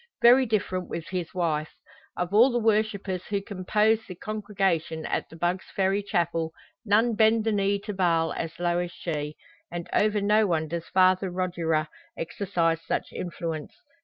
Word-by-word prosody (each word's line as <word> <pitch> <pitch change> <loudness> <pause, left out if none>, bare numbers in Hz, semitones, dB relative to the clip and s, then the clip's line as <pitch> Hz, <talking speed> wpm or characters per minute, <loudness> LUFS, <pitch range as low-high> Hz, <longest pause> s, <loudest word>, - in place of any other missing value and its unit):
Very 250 +2 +7
different 185 -4 -1
with 165 0 -5
his 180 -3 -3
wife. 155 -4 -1 0.4
Of 180 +2 -2
all 235 +5 +7
the 240 - 0
worshippers 210 -4 0
who 200 -1 0
compose 210 +2 +1
the 185 - -7
congregation 195 -6 -2
at - - -2
the - - -12
Bugg's 175 +3 -1
Ferry 195 +1 +2
Chapel 170 -4 -1 0.3
none 225 +2 +3
bend 220 +1 +4
the 225 - +1
knee 200 -1 +1
to 210 0 -5
Baal 170 -4 +2
as 165 +1 -5
low 175 0 +1
as 175 -1 -3
she; 150 -4 -4 0.3
and 175 -1 -5
over 210 0 +3
no 210 +1 +3
one 160 -3 0
does 170 +1 -4
Father 185 0 +3
Rogier 170 -4 -1 0.3
exercise 165 -2 -1
such - - -3
influence. 165 -3 -5
185 Hz, 160 wpm, -26 LUFS, 170-210 Hz, 0.4 s, Very